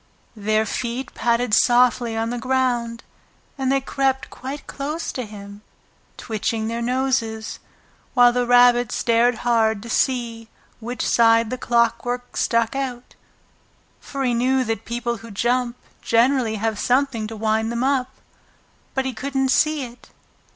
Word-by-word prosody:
Their 215 +1 +1
feet 245 +3 -4
padded 235 0 0
softly 240 0 +3
on 225 +1 -1
the 245 - -3
ground, 240 -2 -1 0.5
and 265 -1 -1
they 275 - +3
crept 270 0 -1
quite 275 +3 -7
close 300 +4 -4
to 250 -4 -5
him, 205 -1 -11 0.6
twitching 220 0 -2
their 230 +1 -3
noses, 245 -3 -1 0.6
while 245 -1 +6
the 245 0 0
Rabbit 245 -1 +5
stared 235 +2 +2
hard 220 -3 +2
to 235 - -7
see 235 -4 -1 0.3
which 240 +2 -4
side 230 -1 +4
the 255 - -2
clockwork 240 +1 0
stuck 230 +1 +1
out, 255 -3 -4 0.9
for 275 -1 -5
he 250 -2 +1
knew 255 +2 +2
that 225 -2 -3
people 235 0 -3
who 225 +1 -12
jump 240 +3 0 0.2
generally 235 -1 +2
have 220 0 -2
something 250 -4 +1
to 225 - -7
wind 220 +1 0
them 235 +1 -1
up. 265 -2 +1 0.9
But 265 0 0
he 265 - -2
couldn't 270 +2 -1
see 305 +1 +2
it. 245 0 -11
240 Hz, 145 wpm, -22 LUFS, 225-255 Hz, 0.9 s, while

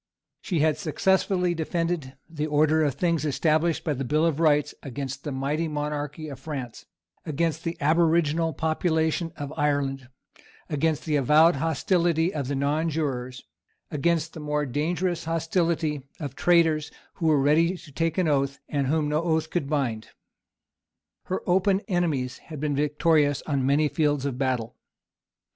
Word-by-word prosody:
She 175 -7 -1
had 155 -1 +2
successfully 185 +1 +1
defended 165 -4 -2
the 155 -2 -3
order 155 +1 +3
of 145 -3 0
things 170 -3 0
established 155 +2 +1
by 150 - 0
the 135 0 -3
Bill 150 +5 +1
of 160 -3 0
Rights 150 -3 +3
against 140 0 -6
the 150 - -4
mighty 140 +5 -1
monarchy 150 0 -4
of 140 -3 -8
France, 130 -5 -7 0.4
against 160 0 -1
the 165 0 -3
aboriginal 165 +1 +2
population 160 +1 0
of 145 +1 -5
Ireland, 140 -3 -1 0.6
against 155 +1 0
the 155 -2 +1
avowed 150 +4 +5
hostility 165 +2 +1
of 140 -4 -3
the 140 - -2
nonjurors, 140 -3 -1 0.5
against 160 +2 0
the - - -8
more 150 -1 -1
dangerous 165 +6 -1
hostility 165 -2 0 0.2
of 140 -4 -5
traitors 165 -3 +3 0.3
who 165 - 0
were 155 -2 +4
ready 165 +6 +3
to 155 - -14
take 165 +4 -1
any 185 -3 +2
oath, 140 -2 +1
and 140 -2 -1
whom 155 +1 +1
no 150 +1 +1
oath 160 -2 0
could 150 -6 -1
bind. 125 -8 -1 1.2
Her 185 - -3
open 190 +2 +3
enemies 165 - -1
had 155 -3 -9
been 145 -1 -1
victorious 150 0 +2
on 140 -4 0
many 145 +2 +3
fields 145 -2 0
of 130 -3 -3
battle. 125 -4 -1
155 Hz, 150 wpm, -26 LUFS, 145-165 Hz, 1.2 s, avowed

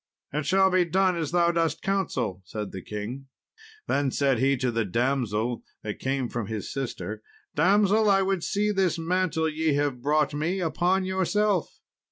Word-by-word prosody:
"It 150 0 -2
shall 190 0 +4
be 185 -1 +4
done 185 +2 +2
as 160 -4 -2
thou 170 0 +3
dost 165 -2 0
counsel," 130 - -1
said 105 +2 -6
the 95 - -6
king. 110 +8 -6 0.6
Then 140 -1 +1
said 135 -2 +1
he 135 +1 +3
to 125 -1 0
the 115 -1 0
damsel 120 +1 -1 0.2
that 105 -1 -5
came 135 -1 -1
from 115 -3 -4
his 110 -3 -5
sister, 115 -5 -4 0.3
"Damsel, 205 +6 +4
I 195 -1 +4
would 190 -3 0
see 210 +1 0
this 190 -4 +1
mantle 165 -1 0
ye 155 -1 0
have 145 -4 -1
brought 150 +2 +2
me 165 +6 -1
upon 180 +2 +1
yourself." 190 0 0
155 Hz, 170 wpm, -26 LUFS, 125-185 Hz, 0.6 s, shall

